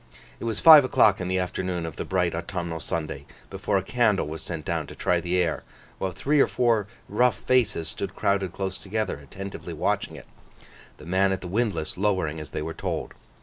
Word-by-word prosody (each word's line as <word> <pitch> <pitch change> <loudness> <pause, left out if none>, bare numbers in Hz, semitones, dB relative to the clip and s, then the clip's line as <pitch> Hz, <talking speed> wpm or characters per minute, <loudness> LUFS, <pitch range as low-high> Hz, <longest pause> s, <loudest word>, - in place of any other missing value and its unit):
It - - -6
was 115 -3 -1
five 155 -3 +10
o'clock 105 -6 +4
in 90 - -2
the 95 0 0
afternoon 90 -1 -2
of 80 -3 -6
the - - -4
bright 90 -2 0
autumnal 85 -1 -4
Sunday, 75 -3 -4 0.2
before 100 +1 0
a 95 - -1
candle 110 -5 +2
was 80 +1 -6
sent 85 -3 -6
down 80 -3 -2
to - - -10
try 90 -1 +1
the 90 +2 0
air, 85 -3 +1 0.4
while 95 - -1
three 145 - +1
or - - +6
four 115 -5 +1 0.2
rough 120 +3 +2
faces 115 -10 +1
stood - - -5
crowded 100 -2 0
close 95 +1 -4
together, 105 -2 -2
attentively 95 +7 -8
watching - - -1
it: - - -11 0.7
the 75 - -13
man 95 +3 +2
at 95 - -2
the 90 - -6
windlass 95 -6 -1
lowering 95 -7 0
as 75 - -8
they - - -4
were 80 +1 -4
told. - - -4
95 Hz, 200 wpm, -26 LUFS, 85-105 Hz, 0.7 s, five